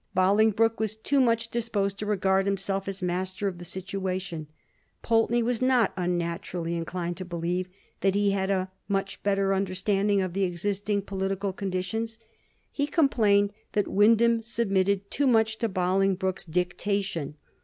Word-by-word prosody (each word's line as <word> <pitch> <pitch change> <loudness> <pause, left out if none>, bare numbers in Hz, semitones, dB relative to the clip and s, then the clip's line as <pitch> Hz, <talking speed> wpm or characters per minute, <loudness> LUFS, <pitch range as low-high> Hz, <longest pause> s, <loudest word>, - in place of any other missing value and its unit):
Bolingbroke 220 +4 +3
was 220 -1 -1
too 275 +6 0
much 230 -2 +2
disposed 205 -4 -1
to 210 - -3
regard 195 -1 +2
himself 195 0 -1
as 195 -1 -4
master 185 +3 -2
of 180 -3 -4
the - - -8
situation; 185 -2 -4 0.6
Pulteney 230 +1 +2
was 240 0 -1
not 255 -4 +3
unnaturally 175 -1 -2
in 165 -1 -3
clined 175 0 -4
to 185 - -4
believe 175 +1 -2 0.3
that 195 0 +2
he 205 0 +3
had 195 -1 0
a 190 -1 0 0.2
much 195 -1 -2
better 195 -1 +1
understanding 195 +1 +1
of 185 -2 -1
the 195 +1 0
existing 200 +3 -1
political 195 0 -2
conditions; 200 +4 -3 0.5
he 285 0 -1
complained 210 - +3 0.2
that 205 - +1
Wyndham 230 +3 +4
submitted 200 -4 0
too 285 - +1
much 220 -2 +3
to 230 - 0
Bolingbroke's 190 0 0
dictation. 180 -2 -2
195 Hz, 145 wpm, -27 LUFS, 185-215 Hz, 0.6 s, Wyndham